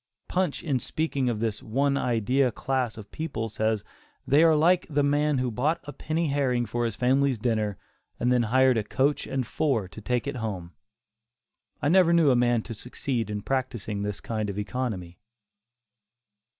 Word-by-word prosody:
Punch 185 -5 -1
in 140 -5 0
speaking 140 -3 -1
of 115 -3 -2
this 110 -1 -2
"one 135 +4 +1
idea" 125 +1 +1
class 130 -1 -2
of 105 -2 -10
people 135 -8 -3
says 110 -1 0 0.4
"they 145 +3 +4
are 165 -1 +6
like 175 +4 +3
the 145 -1 +1
man 145 0 +2
who 125 -1 0
bought 145 +9 0
a 145 - -8
penny 155 +3 -1
herring 130 -4 +1
for 120 +2 -1
his 115 - -2
family's 130 +1 +2
dinner 110 -3 -1 0.4
and 125 - +2
then 125 -1 +4
hired 130 -1 +4
a - - -2
coach 135 +7 0
and 135 -2 -1
four 125 -6 0
to 110 - -11
take 125 +3 -1
it 140 -2 -3
home." 95 -7 -5 1.1
I 145 - +3
never 175 -1 +5
knew 165 -5 +5
a - - +4
man 120 -2 +2
to 115 - -6
succeed 125 +1 -3
by 105 -1 -4
practising 120 -6 -2
this 105 -1 -3
kind 110 -2 -3
of 100 - -5
economy. 105 -5 -4
125 Hz, 175 wpm, -27 LUFS, 110-140 Hz, 1.1 s, are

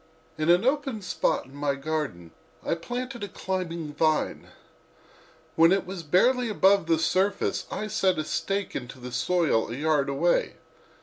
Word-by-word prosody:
In 155 +1 -1
an 175 +5 +5
open 270 -5 0
spot - - 0
in 135 - -17
my 145 -1 -1
garden 140 - -4 0.3
I - - +1
planted 245 +7 -5
a - - -3
climbing 170 -5 -4
vine. 155 +1 0 1.1
When 165 +1 +6
it 195 0 +2
was 185 -1 -6
barely 235 - +2
above 195 -3 +3
the 165 -1 +3
surface 185 +5 0
I 215 - -3
set 190 -2 +1
a 155 - -1
stake 195 +5 -2
into 125 +1 -6
the 125 0 -8
soil 155 -3 +1
a - - -3
yard 150 -1 +1
away. 155 +6 +1
170 Hz, 160 wpm, -26 LUFS, 150-195 Hz, 1.1 s, When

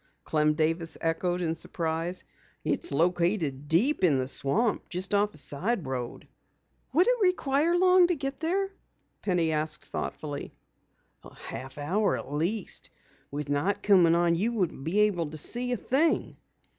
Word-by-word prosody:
Clem 150 -1 +1
Davis 160 +1 0
echoed 175 +2 -1
in 160 -1 0
surprise. 165 +1 -2 0.4
"It's - - 0
located 165 -2 0
deep 195 - +2
in 155 -7 +4
the 130 0 -1
swamp, 205 - +1
just 185 +3 -3
off 205 +1 +2
a - - -13
side 170 +7 -2
road." 125 -2 -5 0.7
"Would 350 +7 +4
it - - +3
require 340 -3 +2
long 365 0 +5
to 355 - +1
get 275 -2 -5
there?" 385 +5 -1 0.5
Penny 175 -5 +1
asked 155 0 -1
thoughtfully. 145 -2 -5 0.7
"A - - -14
half 135 +3 -8
hour 185 +9 0
at 145 - -7
least. 180 +7 -2 0.4
With 145 0 -5
night 150 +8 0
coming 180 -5 +5
on 170 0 +3
you 210 +8 0
wouldn't 180 -10 -2
be 190 +6 +2
able 185 -6 +2
to 155 - -7
see 245 - +1
a 245 - +1
thing." 300 +9 +1
175 Hz, 155 wpm, -28 LUFS, 155-235 Hz, 0.7 s, long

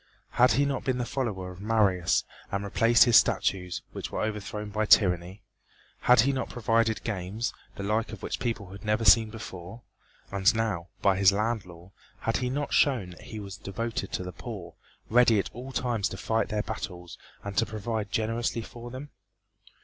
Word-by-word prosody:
Had 125 -2 +5
he 140 +5 +3
not 140 -2 -2
been 130 -2 0
the 125 - -1
follower 105 -9 -3
of 90 +1 -11
Marius 100 -5 +2 0.3
and 100 0 -1
replaced 115 +3 +5
his 120 -2 +6
statues 90 -2 +1
which - - -6
were - - -2
overthrown 105 -1 -4
by 110 +1 0
tyranny? 90 -1 +3 0.6
Had 125 -2 +6
he 135 +3 +2
not 130 - -2
provided 115 -1 +1
games 105 +2 -3 0.2
the 100 - -6
like 110 +3 0
of - - -9
which - - -3
the - - -6
people 110 -6 -3
had 100 - -10
never 105 +1 0
seen 110 +2 +7
before? 105 -1 -9 0.5
And 100 +3 +3
now, 105 -7 -1 0.2
by 95 -2 +4
his 100 -1 +6
land 105 0 -1
law, 90 +1 -13 0.3
had 115 - 0
he 125 -1 -1
not 145 +2 -2
shown 120 -11 +2
that 90 - -13
he 110 - -8
was 100 -2 -7
devoted 110 0 -4
to - - -2
the 90 0 -7
poor, 95 -6 -8 0.3
ready 120 -1 +5
at 100 - -1
all 125 +3 -8
times 120 -6 0
to 95 - -7
fight 110 +3 0
their 105 -1 -1
battles 90 -6 -6 0.2
and 100 -1 -6
to 115 - +2
provide 110 -1 -3
generously 115 +1 -1
for 120 +2 -9
them? 130 +4 -8
110 Hz, 190 wpm, -28 LUFS, 95-115 Hz, 0.6 s, seen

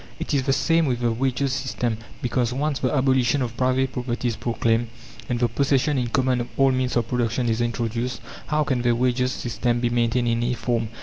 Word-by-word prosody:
It - - -3
is 140 - +3
the 135 +1 0
same 160 +4 +2
with 125 -2 -1
the 120 -1 +2
Wages' 130 +3 0
system; 120 -4 -2 0.2
because, 125 -1 0
once 140 +2 -1
the 130 - 0
abolition 130 -1 +2
of 120 -1 -4
private 130 +1 +1
property 125 -1 -2
is 115 - -3
proclaimed, 115 0 0 0.4
and 120 -1 0
the 120 - +3
possession 140 +3 +1
in 125 - -1
common 125 +1 +1
of 120 - -4
all 135 -1 +5
means 130 -1 0
of 120 -2 +1
production 120 0 0
is 115 +1 +1
introduced, 120 +1 -2 0.3
how 155 -1 +1
can 130 -4 0
the 120 -1 +2
wages' 125 +1 +1
system 120 0 -1
be 120 0 0
maintained 120 +1 +1
in 115 0 +2
any 120 +1 0
form? 115 0 -1
125 Hz, 210 wpm, -24 LUFS, 120-130 Hz, 0.4 s, all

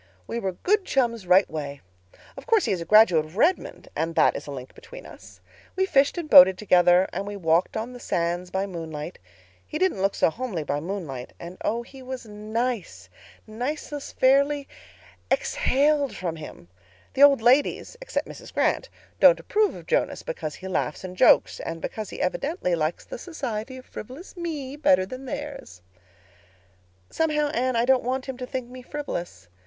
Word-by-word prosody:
"We 235 - -4
were 190 -4 -2
good 405 - +1
chums 235 - 0
right 185 +2 +5
way. 145 -3 -6 0.6
Of - - -11
course 450 -4 +3
he - - 0
is 185 -3 -1
a - - -5
graduate 210 -7 +6
of 155 +5 -13
Redmond, 340 +10 +1
and 165 0 -2
that - - +4
is - - -6
a - - -6
link 130 -2 -8
between - - -12
us. - - -14 0.3
We 380 0 +2
fished 280 -3 +2
and 340 -3 -3
boated 185 -7 +9
together; 180 -2 +4
and 200 - -4
we 205 - -5
walked 170 0 +1
on 230 +3 -4
the 245 - -10
sands 175 -2 -2
by 190 +2 -1
moonlight. 165 -3 -7 0.5
He 305 - -4
didn't 370 - +1
look 195 +1 +1
so - - +3
homely 220 -7 -4
by 145 0 -2
moonlight 155 -7 -6
and 170 +2 -8
oh, 230 +2 -1
he 265 +2 -14
was 255 -1 -7
nice. 215 +1 -4 0.4
Niceness 280 +6 -5
fairly 280 +2 +3 0.6
exhaled 290 - +1
from 170 -3 -4
him. 150 - -10 0.5
The 270 - -1
old 280 -5 +7
ladies—except 295 - +1
Mrs. - - -11
Grant—don't - - +2
approve 425 -1 +1
of - - -11
Jonas, - - 0
because 485 - -5
he 190 - -9
laughs 180 -4 -2
and 185 -1 -7
jokes—and 165 -2 +3
because 215 +4 -5
he - - -7
evidently 230 - -1
likes 160 0 -1
the - - -8
society 255 -6 -5
of 255 - -12
frivolous 265 - -10
me 305 -6 -5
better 185 -11 +3
than 255 +6 -8
theirs. 265 - -7 1.3
"Somehow, 300 -2 +1
Anne, 255 -4 0
I 230 +1 +2
don't 260 0 +4
want 255 +2 -2
him 265 -2 -6
to 250 -1 -6
think 255 -2 -4
me 255 +1 -10
frivolous. 175 - -6
235 Hz, 175 wpm, -25 LUFS, 180-280 Hz, 1.3 s, boated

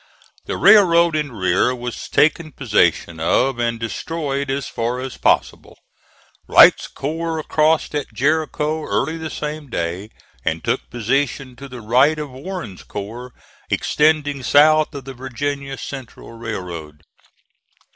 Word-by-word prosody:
The - - -3
railroad 170 -5 +6
in 150 -3 -1
rear 95 +4 +1
was 120 -1 -6
taken 155 +1 +2
possession 90 - +1
of 120 +10 +1
and 115 -1 -1
destroyed 140 - -3
as 135 0 -2
far 120 +2 -2
as 130 0 -6
possible. - - 0 0.7
Wright's - - +7
corps 160 +2 -4
crossed 155 +1 +1
at 145 -1 -3
Jericho 155 +1 0
early 160 +5 -1
the 160 -1 -5
same 150 -1 -5
day, 90 +1 -3 0.3
and - - -2
took - - -2
position 130 +2 -1
to 140 0 -10
the 125 -2 -9
right 130 +8 +3
of 150 -3 -5
Warren's 135 - -7
corps, 115 +5 -7 0.4
extending 150 -2 +1
south 155 +3 +4
of 135 -2 -7
the 135 - -7
Virginia 135 +2 -4
Central 135 -5 -9
Railroad. 90 -10 -7
135 Hz, 130 wpm, -20 LUFS, 115-155 Hz, 0.7 s, Wright's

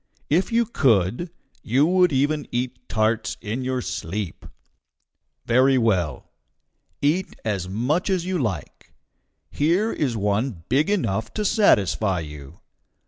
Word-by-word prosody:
If 180 +9 +2
you 235 0 +3
could, 125 - +1 0.3
you 130 +6 +2
would 180 0 +3
even 145 +2 0
eat 125 +1 -4
tarts 110 +1 0
in 110 +5 -4
your 130 -1 -2
sleep. 100 -5 -5 1.0
Very 130 +3 +4
well. 95 - 0 0.7
Eat 165 +6 +1
as 95 -4 -2
much 130 - 0
as 185 -3 0
you 185 -1 -1
like. 110 -8 -5 0.6
Here 175 +9 +1
is 130 -7 -1
one 105 -1 -1
big 145 +7 +2
enough 110 - -1
to 210 - -1
satisfy 105 - +3
you. 75 0 -10
125 Hz, 125 wpm, -23 LUFS, 105-165 Hz, 1.0 s, Very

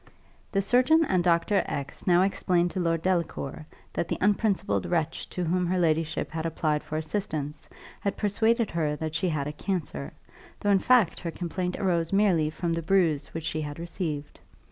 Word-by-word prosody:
The 195 0 +1
surgeon 255 +10 +4
and 185 -9 +1
Dr. 175 +4 +3
X 140 +6 -5
now 180 0 +5
explained 180 -2 +1
to - - -3
Lord 165 -2 0
Delacour 170 -5 -1 0.3
that - - -1
the - - -2
unprincipled 200 - +1
wretch 165 -2 -1
to 180 - -3
whom 180 +1 +1
her 185 +1 +1
ladyship 160 -2 0
had 160 0 -3
applied 155 -2 0
for 155 - -4
assistance 155 -3 -3 0.3
had 200 - -2
persuaded 220 +2 +1
her 155 -3 0
that 155 0 -4
she 170 +3 0
had 150 -4 -1
a 150 - -4
cancer, 150 - -3 0.5
though 205 - +1
in 195 - +5
fact 235 -5 +3
her 170 - -4
complaint 180 +2 -3
arose 170 -4 0
merely 190 -6 +3
from 165 +2 -2
the 165 - -1
bruise 165 -4 +2
which 165 - -6
she 155 -1 -2
had 145 -1 -5
received. 165 -4 -4
170 Hz, 180 wpm, -27 LUFS, 155-190 Hz, 0.5 s, now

